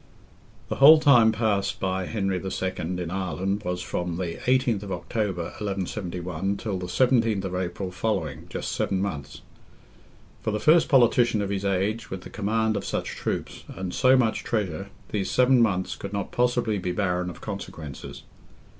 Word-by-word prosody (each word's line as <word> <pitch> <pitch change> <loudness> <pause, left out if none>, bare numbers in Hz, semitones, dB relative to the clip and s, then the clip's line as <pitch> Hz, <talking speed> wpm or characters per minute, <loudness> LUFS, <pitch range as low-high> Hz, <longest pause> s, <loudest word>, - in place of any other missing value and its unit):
The - - -2
whole 155 +3 +9
time 125 -7 +6
passed 105 -3 0
by 95 -1 -1
Henry 95 -4 -1
II. 95 -1 -2
in 90 0 -3
Ireland 95 +2 -2
was 90 -1 -3
from 90 -1 -3
the 90 -2 -3
18th 125 -6 +2
October, 95 -1 -2 0.2
1171, 95 -2 -3
till 100 -5 -3
the 90 - -5
17th 115 0 +2
of 95 -2 -4
April 90 +1 -3
following, 90 -7 -2
just - - -4
seven 95 - 0
months. 85 -8 -4 1.0
For - - -2
the 105 0 -1
first 160 +6 +5
politician 120 -4 +4
of 100 -1 -2
his 100 -1 -2
age, 100 +4 0
with 95 -1 -5
the - - -11
command 110 +1 0
of - - -2
such - - -2
troops, - - -4
and 95 -1 -4
so 130 0 +5
much 115 -3 +1
treasure, 100 -4 -2 0.2
these 100 -2 -2
seven 125 0 +4
months 95 -5 +1
could 100 0 -7
not 100 -1 -3
possibly 120 -4 +1
be 90 0 -2
barren 90 -2 0
of 90 - -9
consequences. 85 -8 -7
100 Hz, 165 wpm, -26 LUFS, 90-110 Hz, 1.0 s, whole